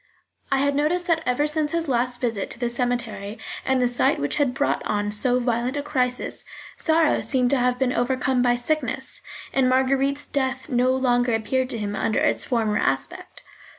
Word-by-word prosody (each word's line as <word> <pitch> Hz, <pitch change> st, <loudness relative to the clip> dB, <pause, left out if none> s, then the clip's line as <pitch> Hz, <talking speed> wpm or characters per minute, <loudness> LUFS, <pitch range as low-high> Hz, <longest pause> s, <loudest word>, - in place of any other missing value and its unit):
I 275 Hz, -, +3 dB
had 280 Hz, +1 st, +2 dB
noticed 310 Hz, +5 st, 0 dB
that 330 Hz, -2 st, +1 dB
ever 250 Hz, +4 st, +2 dB
since 300 Hz, 0 st, -1 dB
his 335 Hz, -1 st, -1 dB
last 245 Hz, -1 st, 0 dB
visit 230 Hz, -5 st, -2 dB
to -, -, -4 dB
the 240 Hz, -1 st, 0 dB
cemetery, 240 Hz, -4 st, -2 dB, 0.3 s
and 265 Hz, -1 st, +1 dB
the 250 Hz, -, +3 dB
sight 245 Hz, 0 st, +2 dB
which 145 Hz, -, -2 dB
had 275 Hz, -4 st, +1 dB
brought 285 Hz, -, 0 dB
on 205 Hz, 0 st, -1 dB
so 245 Hz, +4 st, +2 dB
violent 240 Hz, +2 st, -1 dB
a 285 Hz, -, -2 dB
crisis, 255 Hz, -4 st, -1 dB, 0.3 s
sorrow 320 Hz, -1 st, +2 dB
seemed 250 Hz, -3 st, +2 dB
to 280 Hz, -, +3 dB
have 250 Hz, 0 st, +1 dB
been 255 Hz, -1 st, +1 dB
overcome 255 Hz, +1 st, +1 dB
by 245 Hz, -1 st, +3 dB
sickness, 305 Hz, +6 st, -2 dB, 0.3 s
and 260 Hz, -2 st, +3 dB
Marguerite's 270 Hz, +2 st, +1 dB
death 265 Hz, -1 st, -2 dB
no 250 Hz, -1 st, +2 dB
longer 245 Hz, -2 st, +2 dB
appeared 255 Hz, +4 st, -1 dB
to 235 Hz, -, -3 dB
him 205 Hz, -1 st, -3 dB
under 220 Hz, -, 0 dB
its -, -, +1 dB
former 220 Hz, -4 st, 0 dB
aspect. -, -, -3 dB
255 Hz, 185 wpm, -23 LUFS, 240-275 Hz, 0.3 s, I